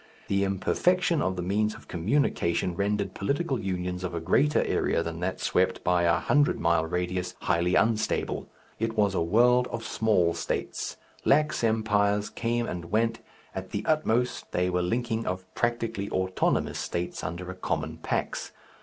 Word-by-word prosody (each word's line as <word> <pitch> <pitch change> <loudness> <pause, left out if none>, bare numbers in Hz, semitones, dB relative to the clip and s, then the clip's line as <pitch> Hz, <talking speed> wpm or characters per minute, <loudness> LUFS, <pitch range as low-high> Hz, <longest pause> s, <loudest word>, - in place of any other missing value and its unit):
The 100 0 +2
imperfection 170 - +2
of 95 0 0
the 90 - -3
means 105 +4 0
of - - -14
communication 90 - 0
rendered 100 0 -1
political 140 +5 -1
unions 90 -1 -3
of 90 -1 -3
a - - -1
greater 135 - +3
area 85 - +1
than 85 0 -5
that 95 +2 -2
swept - - +1
by 90 0 +3
a 85 - +4
hundred 145 0 +2
mile 85 -1 +2
radius 90 +1 -2
highly 90 +1 +1
unstable. 110 +1 +1 0.3
It 115 0 -2
was 100 -2 +3
a - - +1
world 120 +8 +4
of 115 -1 -5
small 105 -7 +2
states. - - -3 0.3
Lax 150 -1 +3
empires 105 -2 +2
came 120 0 -1
and 85 -1 -4
went, 115 +5 0 0.3
at 95 0 -5
the 105 0 -3
utmost 125 -6 +1
they 90 +1 +1
were 90 0 +1
the 90 - -1
linking 115 +1 -1
of 95 0 -3
practically 115 -4 -1
autonomous 95 0 0
states 85 +1 -3
under 90 +3 -4
a - - -8
common 90 - -3
Pax. - - -3
100 Hz, 165 wpm, -27 LUFS, 90-115 Hz, 0.3 s, a